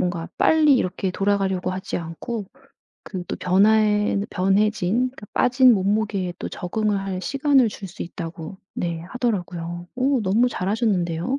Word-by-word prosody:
뭔가 175 -2 -2
빨리 305 -3 +5
이렇게 185 -3 -1
돌아가려고 195 -2 0
하지 185 +1 -4
않고 180 +6 -5 0.6
그 185 -3 -6
또 - - -4
변화에는 210 +1 +3
변해진 210 +5 +1
그 205 - -10
빠진 250 0 +5
몸무게에 200 -2 0
또 - - -6
적응을 205 +3 -1
할 190 -1 -4
시간을 275 -3 +3
줄 200 -1 -8
수 180 - -7
있다고 170 +1 -7 0.2
네 170 -2 -3
하더라고요. 175 -7 -3
어 260 0 +2
너무 210 +6 +3
잘 185 -4 -3
하셨는데요. 200 0 0
195 Hz, 315 characters per minute, -23 LUFS, 180-225 Hz, 0.6 s, 빨리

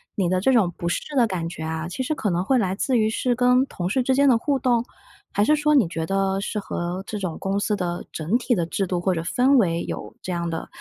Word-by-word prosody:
你 195 -5 +1
的 185 0 +1
这 265 - +3
种 195 -9 +3
不 170 - -3
适 - - -1
的 240 -3 +4
感 175 -5 -3
觉 165 - -8
啊， 160 +1 -3
其 180 +9 -5
实 305 +4 -1
可 210 -8 -1
能 175 +1 0
会 265 +7 +2
来 190 -5 +1
自 250 +5 0
于 215 -1 +3
是 240 +3 0
跟 250 +2 +3
同 180 -2 -4
事 255 +7 +1
之 260 +1 +1
间 280 +1 +4
的 255 - +6
互 280 +2 0
动， 245 -3 +1 0.5
还 205 - +2
是 305 - +4
说 300 0 +2
你 240 - +4
觉 165 -1 -4
得 195 0 0
是 210 - -4
和 180 -1 -4
这 210 - -5
种 180 -5 -4
公 195 +1 -1
司 210 +1 0
的 175 -3 -3
整 160 +7 -2
体 245 0 +1
的 170 -4 0
制 190 +3 -2
度 180 -1 -1
或 185 +2 +1
者 165 - -2
氛 255 +10 +3
围 170 -7 +2
有 - - -6
这 185 - -4
样 170 -1 -2
的 165 -1 -4
195 Hz, 295 characters per minute, -23 LUFS, 175-250 Hz, 0.5 s, 的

